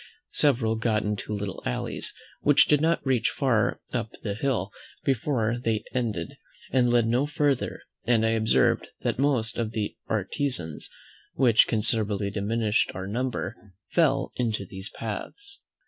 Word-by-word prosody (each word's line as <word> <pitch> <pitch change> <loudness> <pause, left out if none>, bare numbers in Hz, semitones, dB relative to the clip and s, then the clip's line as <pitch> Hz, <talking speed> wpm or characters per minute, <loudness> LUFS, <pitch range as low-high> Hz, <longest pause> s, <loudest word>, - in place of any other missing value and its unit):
Several 115 -6 +2
got 110 -2 +1
into 105 0 -3
little 100 -2 -3
alleys, - - -1 0.3
which 145 -1 +5
did 150 -1 +4
not 165 0 +1
reach 130 -3 +2
far 115 -7 +1
up 115 -4 -1
the 105 - -1
hill 110 -4 -1 0.3
before 120 -3 0
they 110 -2 0
ended, 110 -10 -2 0.3
and 125 -2 +3
led 120 -1 +4
no 125 +5 +2
further; 145 -3 0 0.2
and 115 -2 +3
I - - +3
observed 110 -1 +2
that - - -1
most 125 -5 +1
of 115 -1 -2
the 105 -2 -2
artizans, 105 - -2 0.5
which 120 -5 +5
considerably 105 -2 +1
diminished 105 +2 +1
our 95 +1 -4
number, 110 -2 -4 0.2
fell 140 -5 +2
into 110 -5 -1
these 95 +2 -5
paths. 400 - -7
115 Hz, 140 wpm, -27 LUFS, 105-130 Hz, 0.5 s, which